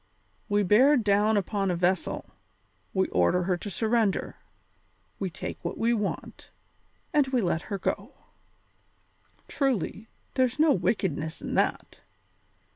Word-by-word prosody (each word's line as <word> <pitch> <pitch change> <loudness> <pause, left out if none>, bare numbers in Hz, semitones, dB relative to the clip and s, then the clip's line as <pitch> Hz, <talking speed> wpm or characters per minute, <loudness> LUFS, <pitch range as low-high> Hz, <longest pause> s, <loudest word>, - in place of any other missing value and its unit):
We 205 0 +2
bear 255 +10 +5
down 210 -1 +3
upon 195 0 -1
a 180 - +1
vessel; 180 +2 -1 0.6
we 190 -1 +1
order 90 - +2
her 180 0 +1
to 205 - -6
surrender; 220 0 0 0.8
we 195 - -2
take 165 - -7
what - - -4
we 235 +1 +2
want, 210 -4 -4 0.6
and 295 -3 +4
we 260 -1 +1
let 175 -6 0
her 200 +1 -4
go. 190 - -3 1.4
Truly, 230 - -1 0.3
there's 255 -1 +1
no 310 0 +5
wickedness 160 - -1
in - - -4
that! - - -1
205 Hz, 125 wpm, -27 LUFS, 185-235 Hz, 1.4 s, bear